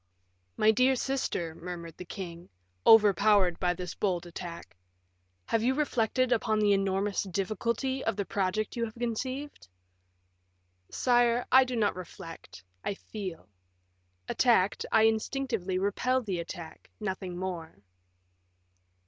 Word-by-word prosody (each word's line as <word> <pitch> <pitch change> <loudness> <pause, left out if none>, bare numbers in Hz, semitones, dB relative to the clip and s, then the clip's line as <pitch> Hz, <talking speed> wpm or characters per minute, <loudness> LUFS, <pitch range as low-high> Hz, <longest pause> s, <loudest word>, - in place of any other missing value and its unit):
"My 215 - +5
dear 255 +4 +3
sister," 250 -11 -2
murmured 170 -1 -7
the 180 - -8
king, 175 -2 -8 0.4
overpowered 205 -4 +6
by 180 -1 +1
this 180 0 -5
bold 180 -4 -1
attack, 170 - -8 0.7
"have 225 - +1
you 255 +3 +2
reflected 255 -3 +1
upon 220 -2 +2
the 210 -1 +4
enormous 195 +1 +1
difficulty 215 +7 -2
of 225 - 0
the 200 -1 -2
project 200 +3 -1
you 235 - -1
have 220 - -9
conceived?" 250 - -4 1.2
"Sire, 240 -1 +2
I 260 +1 +8
do 255 -1 -4
not 215 -3 +1
reflect, 165 - -10 0.2
I 200 - -2
feel. 190 - -7 0.8
Attacked, 220 -6 +2
I 220 - +5
instinctively 220 -3 0
repel 250 +7 +1
the 190 -5 -2
attack, 170 -1 -8
nothing 190 -3 -4
more." 170 - -6
205 Hz, 125 wpm, -29 LUFS, 180-235 Hz, 1.2 s, I